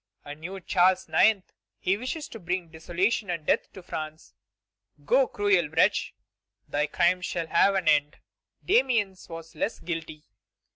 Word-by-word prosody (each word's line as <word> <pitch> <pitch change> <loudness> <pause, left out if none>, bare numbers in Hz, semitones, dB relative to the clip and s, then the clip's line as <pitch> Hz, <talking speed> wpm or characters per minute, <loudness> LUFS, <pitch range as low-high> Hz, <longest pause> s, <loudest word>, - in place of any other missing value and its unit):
A 145 - -6
new 175 +6 -7
Charles 185 +1 +2
IX., 215 -2 +4 0.4
he 190 - +1
wishes 260 +8 -5
to 225 - -9
bring 175 -1 -3
desolation 180 +6 -1
and 170 -3 -3
death - - +1
to 190 - -11
France. 155 -2 -7 0.7
Go, 260 - +4
cruel 200 -7 +2
wretch; 155 - +2 0.5
thy 150 +1 0
crimes 180 +4 +1
shall 170 -2 -2
have 195 +5 +3
an 185 -4 -1
end. 150 -1 +3 0.5
Damiens 235 - +1
was 165 0 -9
less 190 +7 -2
guilty. 160 -3 -6
180 Hz, 145 wpm, -27 LUFS, 160-200 Hz, 0.7 s, IX